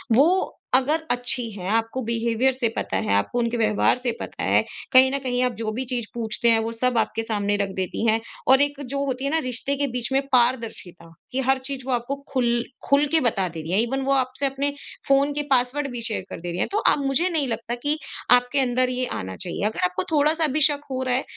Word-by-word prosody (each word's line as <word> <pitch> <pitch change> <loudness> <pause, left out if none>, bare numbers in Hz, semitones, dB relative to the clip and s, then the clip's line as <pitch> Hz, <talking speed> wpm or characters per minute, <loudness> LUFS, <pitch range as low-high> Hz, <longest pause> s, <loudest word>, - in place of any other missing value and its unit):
वो 340 +9 +2 0.2
अगर 290 +5 +2
अच्छी 245 -1 +2
हैं 190 -2 -6
आपको 225 +4 0
बिहेवियर 235 +2 +1
से 255 -3 -1
पता 95 - -2
है, 95 - -1
आपको 100 - 0
उनके 235 0 -1
व्यवहार 215 -2 +2
से 250 -1 -2
पता - - -6
है - - +3 0.3
कहीं 260 0 +6
न 275 - -1
कहीं 250 -1 -1
आप 250 - +1
जो 220 -1 -3
भी 245 +4 -3
चीज़ 245 -2 -2
पूछते 235 0 +1
हैं 225 - +4
वो 225 +1 -2
सब 245 +1 0
आपके 225 0 0
सामने 205 -2 -1
रख 200 -1 -1
देती 190 +4 -3
हैं। 220 0 +3 0.3
और 265 +1 +7
एक 285 0 +1
जो 275 +2 -3
होती 265 0 -3
है 280 - -1
ना 320 - +2
रिश्ते 255 +2 -1
के 285 0 +1
बीच 250 -1 -3
में 270 - +3
पारदर्शिता 230 -9 0 0.2
कि 260 - -2
हर 265 +1 +2
चीज़ 265 0 -4
वो - - -1
आपको 245 +3 -2 0.2
ख़ुल 240 -2 +1 0.3
ख़ुल 280 +1 +4
के 325 - +4
बता 215 -8 +1
दे 165 -1 -7
रही 160 +2 -6
हैं। 190 - +4
ईवन 265 +4 -1
वो 275 - +2
आपसे 260 +1 0
अपने 275 +1 0 0.3
फ़ोन 275 +1 +3
के 295 - 0
पासवर्ड 265 +3 +1
भी 240 -1 -4
शेयर 215 - -3
कर - - -7
दे 175 +1 -5
रही 175 - -4
हैं। - - +1
तो 410 - 0 0.2
अब 280 - -2
मुझे 275 +7 +2
नहीं 310 -6 +1
लगता 235 0 -3
कि 295 +1 +1 0.3
आपके 245 +3 +4
अंदर 255 -1 +1
ये 255 0 0
आना 95 0 -6
चाहिए। 185 +2 -4
अगर 220 - -4
आपको 180 - -2
थोड़ा-सा 305 +2 +2
भी - - +1
शक 290 0 +4
हो 260 0 -2
रहा 255 -1 0
है 260 - 0
250 Hz, 240 wpm, -23 LUFS, 225-275 Hz, 0.3 s, और